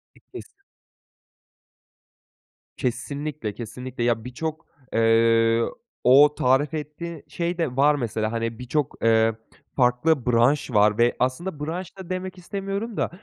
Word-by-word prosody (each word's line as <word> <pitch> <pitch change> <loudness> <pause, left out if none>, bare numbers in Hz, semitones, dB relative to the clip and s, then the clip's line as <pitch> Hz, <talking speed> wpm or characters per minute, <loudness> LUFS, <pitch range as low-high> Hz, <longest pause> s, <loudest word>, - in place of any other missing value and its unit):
Bittiyse. 395 - -13 2.1
Kesinlikle, 140 -1 -3
kesinlikle. 125 +3 -6
Ya, 120 -2 +1
birçok, 155 +5 -5 0.3
eee, 115 0 +4 0.4
o 145 +4 +6
tarif 135 +4 +2
ettiği 155 +1 -6
şey 170 +1 -3
de 160 -7 -1
var 145 +2 +4
mesela. 110 -4 -2
Hani, 115 -1 -3
birçok, 135 +3 -2
eee, 115 0 +4 0.4
farklı 125 +3 +2
branş 125 +4 +2
var 105 -1 +4
ve 120 +1 +3
aslında 145 +7 -2
branş 180 +4 -6
da 190 -2 -10
demek 185 0 -4
istemiyorum 195 +4 -5
da - - 0
130 Hz, 120 wpm, -24 LUFS, 115-160 Hz, 2.1 s, o